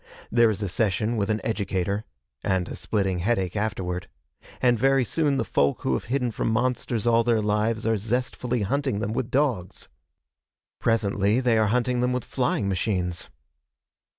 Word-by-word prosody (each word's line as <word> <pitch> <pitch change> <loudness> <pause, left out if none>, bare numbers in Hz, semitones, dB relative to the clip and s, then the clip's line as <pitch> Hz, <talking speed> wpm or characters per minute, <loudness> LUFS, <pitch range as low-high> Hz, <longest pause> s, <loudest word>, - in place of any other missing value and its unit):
There 115 -1 +5
is 105 -1 -2
a - - 0
session 105 +4 0
with 100 -2 -1
an 110 0 0
educator 100 -1 -1 0.4
and 95 -2 0
a - - -6
splitting 95 -4 -1
headache 95 -2 0
afterward 95 -4 -2 0.5
and 120 -2 +3
very 135 +1 +4
soon 145 +1 +1
the - - 0
folk 70 0 +1
who 65 - +1
have - - -2
hidden 125 -1 0
from 115 - -1
monsters 120 -1 0
all 115 0 +4
their 115 -1 +2
lives 105 +1 0
are 115 -1 +2
zestfully 125 +2 -1
hunting 135 +1 0
them 105 +1 -2
with 120 0 -2
dogs. 125 -11 -1 0.9
Presently 105 -1 +2
they 125 -3 +2
are 110 -1 +3
hunting 125 +2 +1
them 125 0 +1
with 125 - -2
flying 125 -5 0
machines. 90 -3 -1
110 Hz, 165 wpm, -25 LUFS, 100-125 Hz, 0.9 s, There